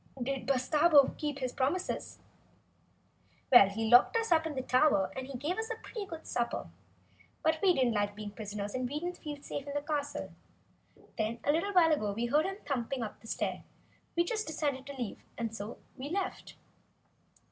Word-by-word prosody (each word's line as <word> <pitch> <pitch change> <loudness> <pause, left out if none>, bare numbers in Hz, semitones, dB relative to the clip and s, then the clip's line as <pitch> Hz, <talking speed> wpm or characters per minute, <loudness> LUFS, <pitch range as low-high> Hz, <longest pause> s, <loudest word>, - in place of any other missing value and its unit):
Did 265 +2 -3
Bustabo 285 +3 +5
keep 295 -2 -3
his 255 -2 -3
promises?" 290 +8 -1 1.3
"Well, 220 -6 +9
he 220 +3 -2
locked 245 - +6
us 455 -3 -1
up 320 -1 +4
in 305 - -5
the 260 - -2
tower, 255 -8 +3
and 260 0 -5
he 275 -2 -5
gave 310 - -2
us 445 +1 -3
a 455 - -2
pretty 435 -3 -7
good 330 -4 -8
supper," 240 -1 -1
answered - - -15
Dorothy. - - -31
"But 315 0 +2
we 380 -2 +5
didn't 250 -3 +2
like 205 -1 0
being 210 -1 -6
prisoners, 205 -1 -5
and 255 -1 -2
we 295 +3 -2
didn't 355 +2 -4
feel 295 -2 -6
safe 285 - -5
in 285 - -5
that 290 0 -2
castle. 290 -2 -3 0.9
Then, 220 +2 0
a - - +3
little 335 +7 0
while 340 -3 +6
ago 295 -9 +1
when 200 - -2
we 230 +2 -1
heard 300 +8 +3
him 385 0 -4
thumping 260 -2 -2
up 215 - -6
the 225 - -13
stair - - -2 0.5
we 340 - +4
just 430 +4 -2
decided 285 -4 -2
to 280 - -7
leave! 240 -5 -5
And 230 -1 -3
so 210 +2 -6 0.2
we 275 +2 -6
left!" 385 +3 -3
275 Hz, 200 wpm, -32 LUFS, 235-320 Hz, 1.3 s, Well